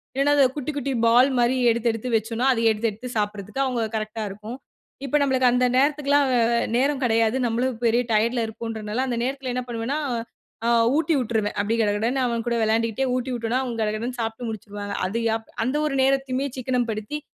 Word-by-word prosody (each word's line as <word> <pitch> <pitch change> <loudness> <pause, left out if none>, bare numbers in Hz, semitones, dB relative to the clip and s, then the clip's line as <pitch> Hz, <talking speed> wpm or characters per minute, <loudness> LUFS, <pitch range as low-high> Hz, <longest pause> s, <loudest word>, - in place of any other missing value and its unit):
இல்லன்னா 280 +2 +3
அது 280 - +5
குட்டி, 295 0 -3
குட்டி 280 -1 -2
பால் 245 +4 +5
மாரி 240 +1 +3
எடுத்து, 235 0 +1
எடுத்து 225 +3 -5
வச்சோன்னா 225 +3 0
அத 235 - -2
எடுத்து, 220 +1 0
எடுத்து 225 +5 -9
சாப்பிட்றதுக்கு 210 +3 -2
அவுங்க 250 -3 -1
கரெக்ட்டா 215 0 -3
இருக்கும். 210 +5 -8 0.5
இப்ப 275 +2 +1
நம்மளுக்கு 260 -2 +3
அந்த 250 +1 +2
நேரத்துக்குல்லாம் 285 0 +3
அ - - +3 0.4
நேரம் 275 +2 +1
கிடையாது. 225 0 +2
நம்மளும் 240 +1 -1
பெரிய 235 +1 +3
டயர்ட்ல 230 +2 +2
இருக்கோம்ன்றதனால, 220 0 -4
அந்த 240 -2 -2
நேரத்தில 265 0 -3
என்ன 250 0 -2
பண்ணுவேன்னா, 235 +5 -2 0.7
ஆ - - +2 0.3
ஊட்டி 320 +1 +1
விட்டுருவேன். 220 -4 -1
அப்பிடி 220 +3 0
கடகடன்னு 220 +5 0
அவன் 235 -2 -1
கூட 235 0 +1
விளையாண்டுக்கிட்டே 225 +3 +1
ஊட்டி 255 +1 -2
விட்டேன்னா 230 +1 -1
அவன் 240 -3 -4
கடகடன்னு 220 +4 -2
சாப்புட்டு 225 +2 -4
முடிச்சுருவாங்க. 205 -1 -6
அது 200 +5 -3 0.2
எப் 225 0 -7 0.2
அந்த 260 +4 -1
ஒரு 275 - -2
நேரத்தையுமே 270 0 +1
சிக்கனம் 250 -2 -1
படுத்தி 215 +7 -4
235 Hz, 180 wpm, -24 LUFS, 220-260 Hz, 0.7 s, அது